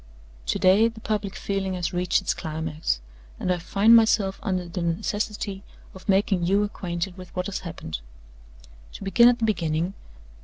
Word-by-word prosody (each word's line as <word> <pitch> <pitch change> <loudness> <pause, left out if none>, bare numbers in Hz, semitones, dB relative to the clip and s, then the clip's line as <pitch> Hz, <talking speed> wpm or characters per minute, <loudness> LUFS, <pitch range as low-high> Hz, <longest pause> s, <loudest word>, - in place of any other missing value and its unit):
To - - +1
day 195 +5 +5
the 230 -1 -7
public 210 -2 -2
feeling 195 -1 -2
has 175 -1 -2
reached 180 0 +1
its - - +1
climax, 160 - -3 0.4
and 180 - +1
I 175 - -3
find 205 +6 +5
myself 215 -4 +3
under 185 -2 -2
the 175 +1 -4
necessity 200 +3 -2 0.3
of 190 +2 -12
making 195 -2 +3
you 200 +2 +3
acquainted 180 -2 -4
with 185 - -10
what 180 0 -1
has 195 -1 -3
happened. 155 - -6 0.9
"To - - -8
begin 235 +5 +6
at 245 - +2
the 230 - 0
beginning. 170 -3 0
190 Hz, 165 wpm, -25 LUFS, 175-205 Hz, 0.9 s, begin